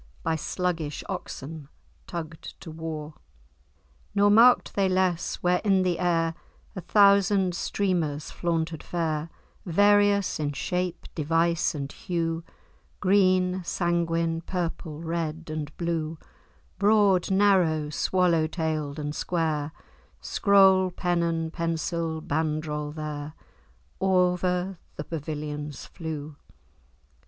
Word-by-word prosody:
By 160 Hz, 0 st, +1 dB
sluggish 165 Hz, -2 st, -2 dB
oxen 150 Hz, +1 st, -6 dB, 0.4 s
tugg'd 165 Hz, -3 st, -7 dB
to 165 Hz, -, -8 dB
war; 155 Hz, -1 st, -6 dB, 1.0 s
Nor 205 Hz, 0 st, +5 dB
mark'd 235 Hz, +4 st, +6 dB
they 195 Hz, -1 st, +2 dB
less, 185 Hz, -2 st, +1 dB
where 180 Hz, 0 st, +3 dB
in 195 Hz, -3 st, +3 dB
the 175 Hz, -2 st, 0 dB
air 165 Hz, -2 st, +1 dB, 0.4 s
A 185 Hz, -, -4 dB
thousand 200 Hz, -2 st, +4 dB
streamers 170 Hz, -6 st, -1 dB
flaunted 165 Hz, -2 st, -2 dB
fair, 160 Hz, -2 st, -2 dB, 0.3 s
Various 205 Hz, +1 st, +3 dB
in 145 Hz, -1 st, -1 dB
shape, 180 Hz, +4 st, -2 dB
device, 165 Hz, +1 st, +1 dB
and 140 Hz, -1 st, -4 dB
hue, 165 Hz, -2 st, -2 dB, 0.6 s
Green, 185 Hz, -1 st, +3 dB
sanguine, 170 Hz, -1 st, 0 dB
purple, 165 Hz, -3 st, -4 dB
red, 165 Hz, -1 st, -3 dB
and 150 Hz, -1 st, -4 dB
blue, 165 Hz, -2 st, -2 dB, 0.6 s
Broad, 200 Hz, -3 st, +4 dB
narrow, 185 Hz, -6 st, +3 dB
swallow 170 Hz, -1 st, +2 dB
tailed, 155 Hz, -3 st, -2 dB
and 150 Hz, -1 st, -3 dB
square, 155 Hz, -3 st, -1 dB, 0.5 s
Scroll, 190 Hz, -2 st, +4 dB
pennon, 170 Hz, -2 st, -1 dB
pensil, 165 Hz, -1 st, -2 dB
bandrol,[#] 150 Hz, -1 st, -2 dB
there 150 Hz, -1 st, -5 dB, 0.7 s
O'er 180 Hz, -1 st, +1 dB, 0.2 s
the 150 Hz, -, -5 dB
pavilions 150 Hz, -2 st, -5 dB
flew. 155 Hz, -3 st, -7 dB
165 Hz, 100 wpm, -26 LUFS, 155-185 Hz, 1.0 s, mark'd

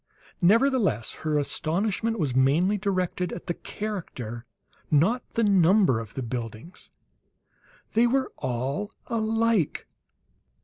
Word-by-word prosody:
Nevertheless 210 Hz, -, +3 dB
her 155 Hz, -1 st, 0 dB
astonishment 195 Hz, +10 st, 0 dB
was 145 Hz, -, -1 dB
mainly 150 Hz, +10 st, +3 dB
directed 185 Hz, -3 st, -1 dB
at 170 Hz, -, -7 dB
the 175 Hz, -, -1 dB
character, 130 Hz, -, -6 dB, 0.4 s
not 185 Hz, -, +3 dB
the 230 Hz, -, +1 dB
number 190 Hz, -, +4 dB
of 115 Hz, -2 st, -9 dB
the 135 Hz, -, -3 dB
buildings. 115 Hz, -, -7 dB, 1.0 s
They 230 Hz, +2 st, +4 dB
were 265 Hz, +2 st, 0 dB
all 130 Hz, -, -3 dB
alike! 225 Hz, -5 st, 0 dB
180 Hz, 105 wpm, -26 LUFS, 135-220 Hz, 1.0 s, number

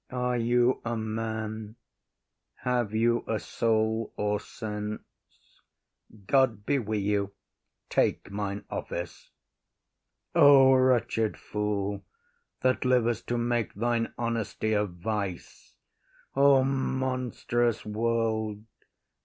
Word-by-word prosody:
Are 125 Hz, 0 st, -1 dB
you 120 Hz, +2 st, +2 dB
a 120 Hz, 0 st, -2 dB
man? 110 Hz, 0 st, -4 dB, 0.9 s
Have 120 Hz, -4 st, 0 dB
you 120 Hz, +1 st, +2 dB
a 110 Hz, -1 st, 0 dB
soul 110 Hz, 0 st, 0 dB
or 105 Hz, 0 st, 0 dB
sense? 105 Hz, -1 st, -5 dB, 1.2 s
God 120 Hz, -5 st, +2 dB
be 140 Hz, +3 st, +2 dB
wi’ 110 Hz, -2 st, -2 dB
you. 100 Hz, -1 st, 0 dB, 0.5 s
Take -, -, 0 dB
mine 100 Hz, 0 st, -4 dB
office.—O 135 Hz, -, +1 dB
wretched 125 Hz, -4 st, +2 dB
fool, 105 Hz, -1 st, -2 dB, 0.6 s
That 130 Hz, 0 st, +2 dB
liv’st 120 Hz, -3 st, +1 dB
to 120 Hz, -, 0 dB
make 120 Hz, -1 st, -1 dB
thine 115 Hz, +2 st, 0 dB
honesty 115 Hz, -2 st, -1 dB
a 105 Hz, 0 st, +2 dB
vice! 95 Hz, 0 st, -5 dB, 0.6 s
O 135 Hz, -1 st, +6 dB
monstrous 130 Hz, -3 st, -1 dB
world! 110 Hz, -1 st, -1 dB
115 Hz, 95 wpm, -28 LUFS, 105-125 Hz, 1.2 s, O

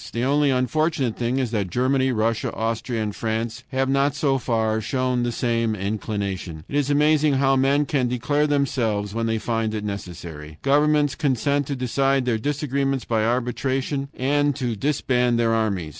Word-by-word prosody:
The 115 Hz, -, -2 dB
only 145 Hz, +2 st, +3 dB
unfortunate 130 Hz, 0 st, 0 dB
thing 120 Hz, +2 st, -1 dB
is 130 Hz, -4 st, -1 dB
that 100 Hz, -5 st, -1 dB
Germany, 130 Hz, +5 st, +1 dB
Russia, 110 Hz, -1 st, 0 dB
Austria, 115 Hz, +1 st, -2 dB
and 105 Hz, -1 st, -4 dB
France 115 Hz, +2 st, -3 dB
have 135 Hz, 0 st, 0 dB
not 140 Hz, +1 st, +2 dB
so 140 Hz, -2 st, +1 dB
far 110 Hz, -2 st, 0 dB
shown 130 Hz, +1 st, 0 dB
the 120 Hz, 0 st, 0 dB
same 115 Hz, -2 st, 0 dB
inclination. 100 Hz, -5 st, -4 dB
It -, -, -6 dB
is 145 Hz, -1 st, +1 dB
amazing 150 Hz, 0 st, +3 dB
how 135 Hz, 0 st, +3 dB
men 140 Hz, +2 st, +3 dB
can 135 Hz, -3 st, 0 dB
deceive 145 Hz, +5 st, 0 dB
themselves 115 Hz, -8 st, 0 dB
when 115 Hz, 0 st, -1 dB
they 115 Hz, 0 st, 0 dB
find 110 Hz, 0 st, -1 dB
it 105 Hz, -, -3 dB
necessary! 85 Hz, -6 st, -7 dB
Governments 145 Hz, +1 st, +3 dB
consent 140 Hz, 0 st, 0 dB
to 140 Hz, -, -2 dB
decide 135 Hz, +1 st, +1 dB
their 115 Hz, -3 st, 0 dB
disagreements 135 Hz, 0 st, -1 dB
by 110 Hz, -2 st, +1 dB
arbitration 130 Hz, +4 st, -1 dB
and 145 Hz, +2 st, +1 dB
to 125 Hz, -4 st, -2 dB
disband 125 Hz, -1 st, +1 dB
their 115 Hz, -1 st, +2 dB
armies! 100 Hz, -8 st, 0 dB
125 Hz, 170 wpm, -23 LUFS, 110-140 Hz, -, only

